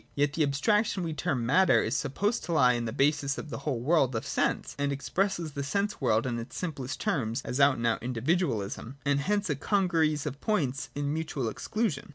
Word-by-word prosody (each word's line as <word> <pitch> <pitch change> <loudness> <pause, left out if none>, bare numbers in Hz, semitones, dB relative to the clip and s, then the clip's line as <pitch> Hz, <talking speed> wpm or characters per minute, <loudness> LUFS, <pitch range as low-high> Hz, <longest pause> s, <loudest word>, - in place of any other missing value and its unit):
Yet 145 0 +1
the 160 - -1
abstraction 185 +8 +2
we 165 -2 -2
term 145 -6 -1
matter 180 +10 +4
is - - -1
sup 140 -2 -2
posed 210 +4 0
to 170 - -2
lie 125 -5 +5
at 120 -1 -2
the - - -3
basis 140 +2 +1
of 150 - -7
the - - -4
whole 140 -4 -2
world 135 -3 +2
of 115 - -2
sense, - - -1
and 140 0 +1
expresses 170 +4 -1
the 140 - -4
sense 200 +7 -1
world 110 -3 +2
in 120 -2 -2
its 115 - -8
simplest 145 -6 -4
terms 130 - -1
as 125 - -3
out 140 -1 +5
and 115 - -2
out 115 - +1
individualisation, 125 - -1
and 140 0 +2
hence 205 +7 0
a - - +1
congeries 165 -7 +1
of 140 - -5
points 145 - -1
in 145 0 -1
mutual 155 -6 -2
exclusion. 210 - -2
145 Hz, 210 wpm, -29 LUFS, 130-175 Hz, -, lie